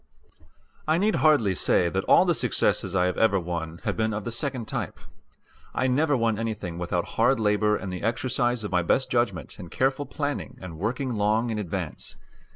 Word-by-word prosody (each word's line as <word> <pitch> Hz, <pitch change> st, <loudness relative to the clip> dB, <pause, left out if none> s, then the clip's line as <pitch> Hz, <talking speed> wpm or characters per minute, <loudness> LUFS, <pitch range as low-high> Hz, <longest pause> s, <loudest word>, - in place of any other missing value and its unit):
I 155 Hz, +1 st, +3 dB
need 210 Hz, +4 st, +2 dB
hardly 140 Hz, -11 st, +4 dB
say 90 Hz, 0 st, +2 dB
that 85 Hz, -, -1 dB
all -, -, +6 dB
the -, -, +3 dB
successes -, -, +1 dB
I 90 Hz, -1 st, +3 dB
have 90 Hz, -, -1 dB
ever 100 Hz, -3 st, +4 dB
won 85 Hz, -1 st, -5 dB
have -, -, -1 dB
been 110 Hz, -1 st, 0 dB
of 110 Hz, -, -4 dB
the 115 Hz, -, -4 dB
second 125 Hz, -1 st, -2 dB
type. -, -, -4 dB, 0.8 s
I -, -, +1 dB
never 145 Hz, +3 st, +2 dB
won 115 Hz, -2 st, +1 dB
anything 105 Hz, -7 st, -4 dB
without 85 Hz, 0 st, -1 dB
hard -, -, +4 dB
labor 105 Hz, 0 st, +2 dB
and 95 Hz, -3 st, -5 dB
the 90 Hz, -, -5 dB
exercise 120 Hz, +1 st, 0 dB
of 105 Hz, -, -4 dB
my 90 Hz, -1 st, +2 dB
best 130 Hz, +10 st, +1 dB
judgment 100 Hz, -, -1 dB
and 90 Hz, -, -8 dB
careful 135 Hz, +6 st, 0 dB
planning 145 Hz, -2 st, -4 dB
and 85 Hz, -4 st, -9 dB
working 120 Hz, +6 st, -2 dB
long 110 Hz, +3 st, +1 dB
in 110 Hz, -, -2 dB
advance. 95 Hz, -6 st, -4 dB
110 Hz, 190 wpm, -26 LUFS, 90-125 Hz, 0.8 s, all